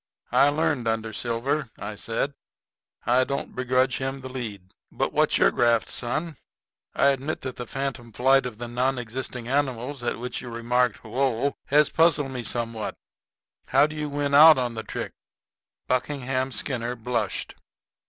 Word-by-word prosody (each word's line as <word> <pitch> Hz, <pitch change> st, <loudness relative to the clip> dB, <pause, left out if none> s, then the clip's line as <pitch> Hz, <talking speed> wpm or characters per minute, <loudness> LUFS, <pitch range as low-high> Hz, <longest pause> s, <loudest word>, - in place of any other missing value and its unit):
"I 140 Hz, -, +5 dB
learned 145 Hz, -5 st, 0 dB
under 110 Hz, 0 st, -1 dB
Silver," 125 Hz, +5 st, -1 dB
I 105 Hz, -, -5 dB
said; 115 Hz, +6 st, -2 dB, 0.7 s
"I 125 Hz, +2 st, +4 dB
don't 140 Hz, +1 st, -4 dB
begrudge 130 Hz, +1 st, +1 dB
him 135 Hz, 0 st, -3 dB
the 130 Hz, -, -7 dB
lead. 105 Hz, -8 st, -7 dB, 0.2 s
But -, -, -1 dB
what's -, -, +3 dB
your -, -, +5 dB
graft, 120 Hz, -2 st, +2 dB
son? 155 Hz, +5 st, -2 dB, 0.6 s
I 140 Hz, -, +5 dB
admit 140 Hz, +3 st, -2 dB
that 130 Hz, -1 st, -5 dB
the 125 Hz, -, -5 dB
phantom 135 Hz, -3 st, -4 dB
flight 130 Hz, +3 st, +3 dB
of 115 Hz, -4 st, -9 dB
the 120 Hz, +1 st, -5 dB
non 125 Hz, +3 st, 0 dB
existing 125 Hz, 0 st, -5 dB
animals 135 Hz, -1 st, -1 dB
at 120 Hz, -, -2 dB
which 125 Hz, +1 st, -5 dB
you 125 Hz, -, -8 dB
remarked 120 Hz, 0 st, 0 dB
'Whoa!' 130 Hz, +3 st, 0 dB
has 150 Hz, +1 st, +4 dB
puzzled 155 Hz, -4 st, +3 dB
me 130 Hz, -2 st, -4 dB
somewhat. 115 Hz, -1 st, -2 dB, 0.7 s
How 135 Hz, +2 st, +5 dB
do 155 Hz, +1 st, -5 dB
you 150 Hz, -1 st, -3 dB
win 145 Hz, 0 st, -1 dB
out 155 Hz, +2 st, +9 dB
on 125 Hz, -2 st, -1 dB
the 110 Hz, -, -4 dB
trick?" -, -, -5 dB, 0.7 s
Buckingham 130 Hz, 0 st, -1 dB
Skinner 125 Hz, -2 st, -1 dB
blushed. 125 Hz, +1 st, -2 dB
125 Hz, 160 wpm, -25 LUFS, 120-140 Hz, 0.7 s, out